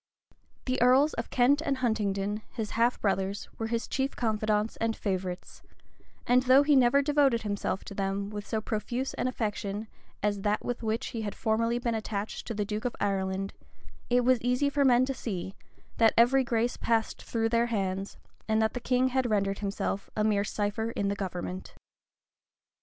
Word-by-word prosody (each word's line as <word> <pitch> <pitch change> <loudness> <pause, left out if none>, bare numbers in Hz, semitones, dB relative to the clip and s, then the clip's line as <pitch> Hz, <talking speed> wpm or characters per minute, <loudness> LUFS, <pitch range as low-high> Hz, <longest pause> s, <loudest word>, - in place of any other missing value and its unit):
The 255 -2 -1
earls 260 +5 +5
of 230 - -4
Kent 270 +4 +3
and 275 -2 0
Huntingdon, 210 -4 -1
his 220 -3 -5
half 235 +2 +2
brothers, 195 0 -1
were 225 - -1
his 230 0 -2
chief 270 +1 -1
confidants 215 -1 0
and 225 0 0
favorites; 185 -2 -4 0.6
and 250 +1 +4
though 260 +2 +6
he 290 0 +4
never 265 +2 +5
devoted 280 -5 +3
himself 205 -2 -2
to - - -8
them 200 +1 -2
with 205 -1 -6
so 220 -1 -1
profuse 240 +5 -3
an - - -1
affection 210 -3 -3 0.4
as 205 -1 0
that 210 +1 0
with 245 -1 -3
which 225 +1 -1
he 230 -3 -4
had 205 -2 -4
formerly 230 +1 +1
been 240 -1 -1
attached 215 -1 -4
to 230 - -3
the 205 0 -1
duke 210 +3 -4
of 245 - -1
Ireland, 195 -1 -1 0.6
it 245 0 +3
was 255 -2 +4
easy 250 +4 +1
for 280 0 +2
men 255 -1 +5
to 270 - -2
see, 190 -7 -5 0.4
that 225 -1 +4
every 255 +3 +5
grace 235 0 0
passed 225 -1 0
through 225 -1 -1
their 235 +1 +2
hands, 195 -3 -2 0.3
and 220 0 +2
that 220 0 +1
the 245 - -3
king 250 +1 +2
had 260 -1 0
rendered 200 -2 0
himself 200 -1 -3
a 210 - +2
mere 210 -2 +2
cipher 210 +2 -2
in 200 -3 -1
the 200 - -1
government. 185 -1 -5
225 Hz, 180 wpm, -29 LUFS, 205-245 Hz, 0.6 s, though